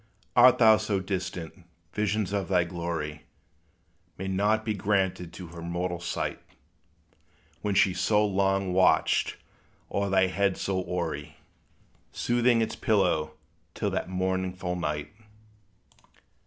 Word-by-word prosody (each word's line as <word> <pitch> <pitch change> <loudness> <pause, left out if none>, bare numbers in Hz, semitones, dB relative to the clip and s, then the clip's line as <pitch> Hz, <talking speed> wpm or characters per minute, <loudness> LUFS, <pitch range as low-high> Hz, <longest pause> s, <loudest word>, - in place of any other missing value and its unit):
Art 125 +1 +7
thou 110 -2 +7
so 105 -2 -1
distant, 90 -2 -5 0.3
visions 105 -1 -1
of 100 -3 -1
thy 90 -2 +3
glory 85 -3 -4 0.9
May 95 - -4
not 105 +3 +1
be 110 - 0
granted 95 -4 0
to 90 - -8
her 85 0 -9
mortal 85 +1 -3
sight; 85 - -3 1.2
When 105 -2 -1
she 95 -1 +4
so 105 +4 +2
long 95 -1 +1
watched 95 0 +3 0.5
o'er 100 0 0
thy 95 -1 +4
head 100 +1 0
so 95 -1 -1
hoary, 75 -5 -4 0.7
Smoothing 120 -1 +2
its - - -4
pillow, 90 -8 +1 0.4
till - - -1
that - - -2
mournful 95 -1 -2
night? 75 -1 -3
95 Hz, 120 wpm, -27 LUFS, 90-100 Hz, 1.2 s, Art